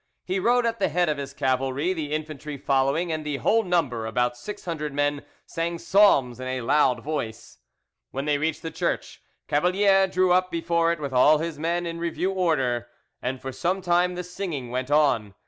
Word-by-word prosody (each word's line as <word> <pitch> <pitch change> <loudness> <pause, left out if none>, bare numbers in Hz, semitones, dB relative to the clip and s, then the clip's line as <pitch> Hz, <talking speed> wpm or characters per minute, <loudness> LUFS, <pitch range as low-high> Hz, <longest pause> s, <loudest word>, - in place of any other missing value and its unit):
He 185 +1 -1
rode 240 +4 +3
at 230 0 -1
the 195 - +2
head 175 +1 +1
of 150 -2 -1
his 140 -1 -5
cavalry, 135 +5 0
the 155 -4 -4
infantry 155 -1 -4
following, 140 +6 +1
and 155 -1 -2
the 150 -2 -3
whole 220 - +3
number—about 125 - 0
six 205 +12 -8
hundred 150 -4 -4
men—sang 145 +3 -3
psalms 155 - +3
in 130 - -5
a 130 0 -2
loud 125 -1 +2
voice. 115 - -5 0.5
When 135 +2 -4
they 145 -1 +1
reached 160 +2 -2
the 165 - -4
church, - - -3 0.3
Cavalier 195 +5 +3
drew 185 -1 +2
up 185 +1 +3
before 170 0 +1
it 170 - -2
with 140 -3 -4
all 145 +5 +6
his 160 -1 -4
men 170 +2 -1
in 170 0 -4
review 170 +3 -1
order, 135 -10 0 0.3
and 130 +1 -3
for 135 - -6
some 170 +9 -1
time 180 0 +2
the 180 - -4
singing 170 -9 -5
went 130 +1 -3
on. 130 -10 +2
155 Hz, 185 wpm, -25 LUFS, 135-175 Hz, 0.5 s, all